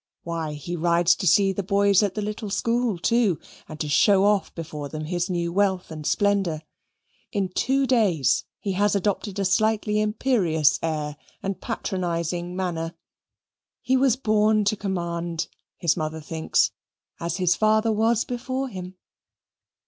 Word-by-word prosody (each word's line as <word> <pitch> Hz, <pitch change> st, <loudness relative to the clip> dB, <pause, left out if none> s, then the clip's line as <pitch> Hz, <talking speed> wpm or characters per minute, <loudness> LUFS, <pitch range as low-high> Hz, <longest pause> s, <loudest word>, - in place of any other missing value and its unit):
Why, 165 Hz, -2 st, -3 dB
he 150 Hz, +4 st, -5 dB
rides 170 Hz, +1 st, +3 dB
to 185 Hz, -, -2 dB
see 195 Hz, +3 st, +4 dB
the 200 Hz, -, -2 dB
boys 200 Hz, +1 st, +3 dB
at 200 Hz, -3 st, 0 dB
the 210 Hz, -, -2 dB
little 210 Hz, 0 st, -4 dB
school, 230 Hz, +1 st, 0 dB
too, 220 Hz, -1 st, +2 dB, 0.3 s
and 155 Hz, -1 st, -8 dB
to 150 Hz, -, -2 dB
show 195 Hz, +6 st, +4 dB
off 205 Hz, -1 st, +2 dB
before 150 Hz, -3 st, -6 dB
them 155 Hz, +1 st, -5 dB
his 175 Hz, +3 st, -2 dB
new 170 Hz, -1 st, -1 dB
wealth 190 Hz, -2 st, +1 dB
and 155 Hz, -2 st, -5 dB
splendour. 195 Hz, -7 st, +1 dB, 0.7 s
In 195 Hz, -3 st, -1 dB
two 270 Hz, +8 st, +1 dB
days 185 Hz, -, +2 dB, 0.2 s
he 200 Hz, -, -3 dB
has 205 Hz, +2 st, +2 dB
adopted 200 Hz, 0 st, -1 dB
a 200 Hz, -, 0 dB
slightly 210 Hz, +2 st, +2 dB
imperious 190 Hz, -, +2 dB
air 150 Hz, -2 st, -2 dB, 0.3 s
and 195 Hz, -1 st, -3 dB
patronizing 175 Hz, -5 st, -3 dB
manner. 170 Hz, -3 st, -3 dB, 0.9 s
He 260 Hz, -, +2 dB
was 260 Hz, -2 st, +4 dB
born 215 Hz, -3 st, +2 dB
to 200 Hz, -, +2 dB
command, 170 Hz, -4 st, -3 dB, 0.3 s
his 170 Hz, -2 st, +2 dB
mother 155 Hz, -1 st, -3 dB
thinks, 160 Hz, +1 st, 0 dB, 0.5 s
as 170 Hz, +1 st, -2 dB
his 180 Hz, -2 st, +2 dB
father 215 Hz, +1 st, +3 dB
was 225 Hz, +1 st, +2 dB
before 255 Hz, +2 st, -3 dB
him. 185 Hz, -3 st, -8 dB
190 Hz, 150 wpm, -24 LUFS, 170-215 Hz, 0.9 s, see